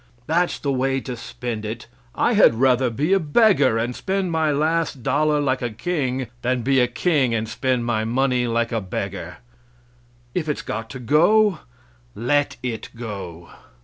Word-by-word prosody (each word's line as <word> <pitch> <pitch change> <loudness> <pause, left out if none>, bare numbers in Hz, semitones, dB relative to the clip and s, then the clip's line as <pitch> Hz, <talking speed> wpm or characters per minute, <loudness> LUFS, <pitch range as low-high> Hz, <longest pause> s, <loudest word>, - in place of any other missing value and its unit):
That's 170 +4 +1
the 140 - -2
way 135 +1 0
to 125 -1 -5
spend 115 -1 -6
it! 110 +2 -5 0.3
I 240 - +2
had 205 - +6
rather 130 +1 +3
be 145 - 0
a 195 - +4
beggar 155 - +3
and 120 +2 -2
spend 190 -2 -2
my 160 -2 +1
last 155 -2 0
dollar 150 +2 +2
like 135 -2 0
a 120 - -1
king, 130 0 -2 0.2
than 125 0 0
be 135 +1 +3
a 125 - +4
king 130 -2 +1
and 110 0 -2
spend 125 +1 -1
my 115 -2 0
money 125 +1 +1
like 115 0 0
a 115 -2 -1
beggar. 95 -2 -5 1.0
If 160 -4 -2
it's 150 - -2
got 115 +1 -5
to 130 - -7
go, 175 - +3 0.6
let 140 +5 0
it 120 -3 -4
go. 95 -8 -7
130 Hz, 170 wpm, -22 LUFS, 115-150 Hz, 1.0 s, had